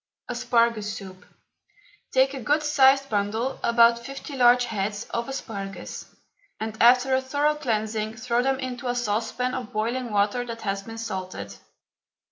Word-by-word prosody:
ASPARAGUS 235 -3 +1
SOUP. 185 -2 -11 0.9
Take 265 +1 +3
a 270 - -5
good 295 +7 +1
sized 275 -2 +4
bundle 220 +4 -1
(about 235 0 +4
fifty 275 +3 -7
large 245 -1 +5
heads) 210 -2 -3
of 235 +2 -2
asparagus, 200 -7 -6 0.5
and 220 0 -4
after 250 +2 +6
a 260 - +3
thorough 285 +3 +1
cleansing 220 -6 -2
throw 235 +2 0
them 265 +1 0
into 255 -1 -5
a 245 - 0
saucepan 240 +2 -1
of 250 -4 -5
boiling 235 +4 -2
water 205 +4 +1
that 230 -1 -7
has 195 -1 -1
been 225 +3 -9
salted. 185 - -5
235 Hz, 145 wpm, -25 LUFS, 215-260 Hz, 0.9 s, after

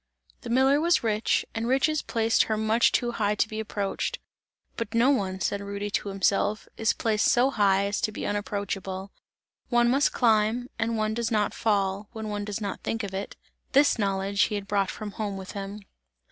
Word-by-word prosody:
The 240 - -8
miller 265 +4 +4
was 340 -3 +3
rich, 215 -1 +1
and 225 +1 -2
riches 280 +4 +2
placed 225 -1 +2
her 220 - -1
much 220 +2 +3
too 240 -1 +1
high 210 -3 0
to 210 - +1
be 215 0 -5
approached; 205 -2 -2 0.6
"but 230 -1 -4
no 240 +4 +5
one," 190 -7 -1
said 200 +1 -1
Rudy 200 +1 -4
to 205 - -1
himself, 195 +2 0
"is 225 - +2
placed 215 -2 +1
so 250 +3 +4
high 200 -4 +3
as 200 +1 -2
to 215 - 0
be - - -5
unapproachable; 200 -2 -3 0.6
one 240 -1 +4
must 275 +3 +3
climb 225 +1 +2
and 225 0 0
one 215 0 0
does 230 0 -1
not 210 -2 +1
fall, 200 -2 0
when 220 -2 -5
one 205 0 -3
does 210 0 -4
not 200 -2 -4
think 225 0 -2
of 195 -1 -5
it." 195 +1 -5 0.4
This 280 -2 +4
knowledge 200 0 0
he 210 - -3
had 200 -1 -4
brought 200 -2 +1
from 215 -1 -6
home 205 -2 -4
with 190 0 -7
him. 200 +1 -6
215 Hz, 195 wpm, -27 LUFS, 200-230 Hz, 0.6 s, no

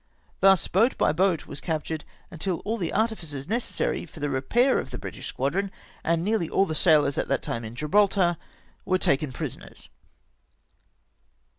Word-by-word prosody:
Thus 195 -2 +5
boat 225 +8 +2
by - - +3
boat 175 +1 +1
was - - -8
captured 160 -1 -3 0.3
until 175 +1 -3
all 225 +2 -2
the 175 -6 -2
artificers 170 -11 -2
necessary 225 -4 -1
for 155 - -13
the 145 -1 -1
repair 240 - +2
of - - -5
the 125 - -6
British - - -7
squadron, 185 +10 -1 0.3
and 165 0 +1
nearly 205 -4 0
all 195 - +3
the 160 - -3
sailors 150 -4 +3
at - - -1
that 135 - 0
time 115 - -3
in 110 +1 -7
Gibraltar, 175 +3 +2 0.5
were 185 - +2
taken 140 -4 +1
prisoners! - - -7
165 Hz, 160 wpm, -26 LUFS, 145-195 Hz, 0.5 s, Thus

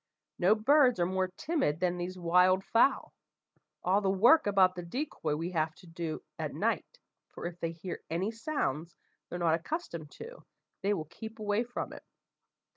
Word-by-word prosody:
No 190 +4 +5
birds 255 0 +4
are 175 - +3
more 185 +1 0
timid 190 - -1
than 180 0 0
these 180 +1 -4
wild 180 +2 +4
fowl. 235 +4 +2 0.7
All 190 +3 +3
the 195 - +1
work 225 +10 +5
about 190 -2 +5
the 180 - -6
decoy 170 - -3
we 165 +4 -3
have 155 -2 0
to - - -17
do 165 -1 -5 0.2
at - - -3
night, - - -1 0.3
for - - -9
if 175 0 -5
they 165 -1 -2
hear 170 +2 -6
any 180 +7 -1
sounds 200 - -2 0.3
they're 175 - -4
not 170 -2 +2
accustomed 170 - -3
to, 485 +2 -10 0.4
they 200 +1 +1
will 160 -4 -4
keep 220 +8 -9
away 210 +1 0
from 245 +1 -5
it. - - -10
185 Hz, 175 wpm, -31 LUFS, 170-220 Hz, 0.7 s, No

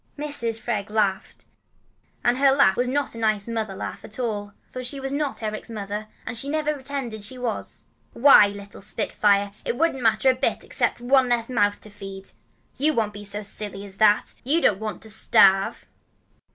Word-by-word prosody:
Mrs. 260 -7 0
Freg 210 -4 -3
laughed, 205 -3 -1 0.8
and 245 +2 +2
her 275 0 +5
laugh 270 -9 +4
was 245 +3 0
not 280 +2 -1
a 230 - -7
nice 215 -2 +1
mother 220 -4 -3
laugh - - -6
at 210 - -8
all, 210 -5 -3 0.2
for 255 - -6
she 275 +3 -3
was 270 0 -3
not 285 -5 -2
Eric's 215 +1 -4
mother, 210 -1 -5 0.2
and - - -5
had 270 +5 -5
never 300 0 0
pretended 270 -5 -5
that - - -11
she 255 +4 -7
was. 245 -3 -5 0.3
"Why, 240 -5 +7
little 200 0 -9
spitfire, 205 -1 +1
it 240 - -2
wouldn't 315 -5 +1
matter 225 +3 +4
a - - -3
bit 255 - -1
except - - 0
to 240 - -15
make 245 - -7
one 260 -2 +5
less 235 -1 0
mouth 205 -4 +1
to 215 - -12
feed. 195 -1 -9 0.4
But - - -15
you 310 +1 +5
won't 215 -2 0
be 205 0 -9
so 205 +1 -5
silly 205 -1 -5
as 195 -1 -9
that. 210 0 +3
You 290 +7 +2
don't 205 - +2
want 215 -1 -5
to 220 - -8
starve." 195 -2 +4
220 Hz, 205 wpm, -24 LUFS, 205-260 Hz, 0.8 s, Why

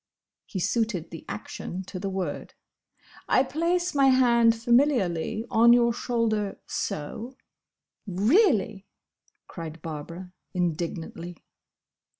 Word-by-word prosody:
He - - -6
suited 205 -4 -1
the 165 - -9
action 175 - -6
to 185 0 -7
the 195 +1 -3
word. 190 -6 -4 0.7
"I 260 - +5
place 345 +6 0
my 275 -2 +4
hand 235 -3 +5
familiarly 230 - +1
on 235 +2 +6
your 235 -1 +4
shoulder—so—" 225 - -3 0.7
"Really!" 215 - +2 0.6
cried 165 -1 -8
Barbara, 170 +4 -7 0.2
indignantly. 170 0 -3
210 Hz, 95 wpm, -26 LUFS, 175-240 Hz, 0.7 s, on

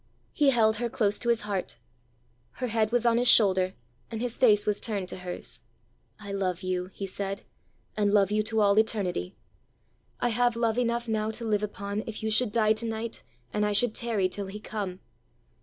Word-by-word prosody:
He 290 -2 +3
held 220 -4 +3
her 240 +1 -2
close 205 -3 +1
to 235 - -2
his 235 -1 +2
heart; 200 -3 -3 0.8
her 255 - -4
head 220 -2 0
was 240 0 +1
on 235 0 +4
his 245 - +4
shoulder, 190 -5 +5 0.3
and 225 - -5
his 240 0 -1
face 210 -5 +4
was 210 -1 -1
turned 200 -5 -2
to - - -6
hers. 180 -1 -6 0.6
"I 200 -1 -8
love 185 -3 -2
you," 185 -1 -2
he 195 +1 -7
said, 195 +1 -4 0.5
"and 205 -1 +1
love 200 -1 +3
you 215 0 +2
to 220 0 0
all 200 0 +4
eternity! 200 - 0 0.8
I 245 - +1
have 240 +1 +2
love 230 0 0
enough 235 0 0
now 215 -1 -1
to 230 +1 -4
live 210 -2 +1
upon, 205 0 -4
if 220 -1 -6
you 220 - 0
should 215 0 +2
die 215 -1 +3
to 220 +2 -4
night, 225 +1 -4 0.3
and 210 - 0
I 210 0 +1
should 215 +2 +3
tarry 225 -6 0
till 195 +2 -4
he 200 +2 -7
come. 200 -4 -5
215 Hz, 200 wpm, -27 LUFS, 200-230 Hz, 0.8 s, shoulder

